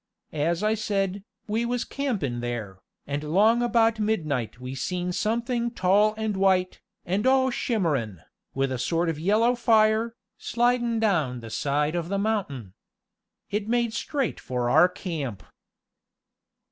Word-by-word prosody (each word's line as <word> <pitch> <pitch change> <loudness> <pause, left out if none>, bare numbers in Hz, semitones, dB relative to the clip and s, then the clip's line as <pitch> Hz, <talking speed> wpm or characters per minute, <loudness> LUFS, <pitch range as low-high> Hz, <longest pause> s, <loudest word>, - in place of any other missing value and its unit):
"As 165 +5 0
I 215 +1 +3
said, 200 -2 -1 0.2
we 220 +2 0
was 245 0 -1
campin' 200 - -2
there, 115 -6 -5 0.3
and 145 +1 -3
'long 210 +10 +3
about 230 -2 +2
midnight 155 - -1
we 125 +1 -6
seen 180 +7 -2
somethin' 235 +4 -1
tall 210 0 +3
and 220 -2 -2
white, 190 -1 +1 0.2
and 195 +7 0
all 260 0 +4
shimmerin', 150 - -1 0.3
with 135 0 0
a 130 - -2
sort 165 +7 0
of 155 -2 -3
yellow 215 +8 +3
fire, 225 -1 +3 0.2
slidin' 240 -1 +1
down 160 - +1
the 115 -1 -9
side 145 +6 0
of 170 -1 -2
the 200 - 0
mountain. 185 - -2 0.8
It 210 0 -2
made 235 -1 +1
straight 270 +2 -2
for 125 -1 -2
our 165 +6 +6
camp." 155 - -5
195 Hz, 140 wpm, -26 LUFS, 145-225 Hz, 0.8 s, our